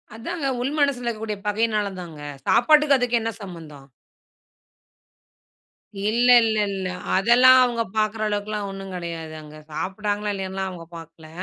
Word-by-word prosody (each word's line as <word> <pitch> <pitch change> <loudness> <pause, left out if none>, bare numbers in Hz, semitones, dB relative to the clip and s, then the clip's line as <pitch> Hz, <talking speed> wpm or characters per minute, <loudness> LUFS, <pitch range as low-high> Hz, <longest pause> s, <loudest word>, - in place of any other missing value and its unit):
அதாங்க 275 +6 -4
உள் 270 +3 -1
மனசுல 280 -4 +1
இருக்கக்கூடிய 220 -2 -3
பகைனாலதாங்க. 205 -6 -2 0.3
சாப்பாட்டுக்கும் 300 +2 +5
அதுக்கும் 245 -2 +1
என்ன 225 0 -2
சம்பந்தம்? 160 -7 -11 2.2
இல்ல 240 +3 +2 0.2
இல்லல்ல. 205 -4 0 0.3
அதெல்லாம் 245 +6 +6
அவங்க 235 -2 0
பாக்குற 215 0 0
அளவுக்குலாம் 205 0 -3
ஒண்ணுங் 195 -1 -8
கிடையாது. 165 -2 -6
அங்க 150 0 -13
சாப்டாங்களா 205 +5 -2
இல்லையான்னுலாம் 190 0 -4
அவங்க 170 -2 -9
பாக்கல. 165 -1 -13
210 Hz, 115 wpm, -23 LUFS, 185-230 Hz, 2.2 s, அதெல்லாம்